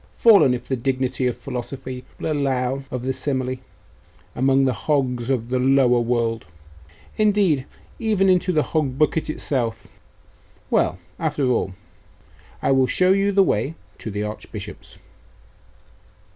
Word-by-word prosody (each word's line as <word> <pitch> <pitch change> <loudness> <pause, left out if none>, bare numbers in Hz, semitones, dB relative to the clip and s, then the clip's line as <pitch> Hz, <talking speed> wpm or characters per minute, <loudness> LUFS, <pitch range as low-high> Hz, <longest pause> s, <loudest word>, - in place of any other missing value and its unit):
fallen, 205 - +6
if 120 0 -8
the 130 - 0
dignity 130 0 -1
of 125 - -2
philosophy 130 0 -6 0.2
will - - -2
allow 135 -2 0
of 125 -1 -4
the 130 +1 -1
simile, 130 -2 -2 0.8
among 135 +1 +3
the 130 - +2
hogs 125 -3 -1
of 120 -3 -1
the 130 0 0
lower 130 -1 +4
world 115 -3 -1 0.7
indeed, 200 -10 +2 0.3
even 215 -4 +2
into 185 0 +3
the 155 -4 +2
hog 140 -5 -1
bucket 155 +1 +1
itself. 120 -7 -2 0.9
Well, 90 - +2 0.2
after 150 -3 0
all, 95 -6 -1 0.9
I - - +2
will 135 -1 +4
show 185 +6 +3
you 195 +1 +3
the 195 0 +5
way 140 - 0 0.2
to - - -6
the 105 0 -3
Archbishop's. 105 0 -8
130 Hz, 135 wpm, -22 LUFS, 125-155 Hz, 0.9 s, fallen